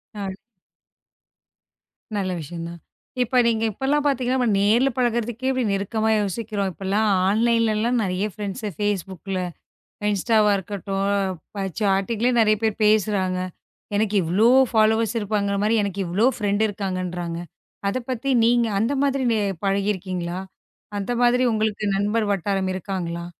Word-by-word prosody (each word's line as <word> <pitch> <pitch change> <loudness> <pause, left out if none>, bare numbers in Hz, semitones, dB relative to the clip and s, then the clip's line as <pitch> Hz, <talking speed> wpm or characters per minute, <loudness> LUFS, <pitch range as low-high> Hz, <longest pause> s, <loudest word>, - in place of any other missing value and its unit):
ஆ. 200 -2 -4 1.9
நல்ல 190 -2 -1
விஷயம் 165 +2 -6
தான். 170 0 -9 0.4
இப்ப 250 +2 -1
நீங்க 225 -1 +1
இப்பலாம் 275 +7 0
பார்த்தீங்கன்னா, 255 -2 +1
நேர்ல 225 +7 +4
பழகுறதுக்கு 240 +1 0
நெருக்கமா 215 +3 0
யோசிக்கிறோம். 205 0 -2
இப்பல்லாம் 195 +4 0 0.2
ஆன்லைன்ல 230 +1 +2
எல்லாம் 240 +3 +1
நிறைய 185 +1 -1
ஃப்ரண்ட்ஸ்.ஃபேஸ்புக்ல, 195 -2 -3 0.7
இன்ஸ்டாவா 210 +1 +3
இருக்கட்டும். 195 0 -3 0.5
பா 195 - -1 0.2
சாட்டிங்ல 205 +4 +1
நிறைய 215 -1 +4
பேர் 220 -2 +1
பேசுறாங்க. 200 -3 +2 0.6
எனக்கு 215 0 0
இவ்ளோ 190 +8 +3 0.2
ஃபாலோவர்ஸ் 220 0 +3
இருப்பாங்கிறமாரி, 205 0 0
எனக்கு 200 -1 -3
இவ்ளோ 190 +7 +2
ஃப்ரண்ட் 205 0 +1
இருக்காங்கன்றாங்க. 185 -4 -3 0.5
அத 200 - -1
பத்தி 255 +2 -3 0.2
நீங்க 235 0 +3
அந்த 230 +7 +1
மாதிரி 275 -1 +1
நே 220 - +1 0.3
பழகி 195 +1 +1
இருக்கீங்களா? 180 -2 -4 0.6
அந்த 200 +4 -3
மாதிரி 245 +1 +4
உங்களுக்கு 215 -1 -1
நண்பர் 210 +2 +1
வட்டாரம் 195 0 0
இருக்காங்களா? 175 -2 -4
205 Hz, 120 wpm, -23 LUFS, 195-230 Hz, 1.9 s, நேர்ல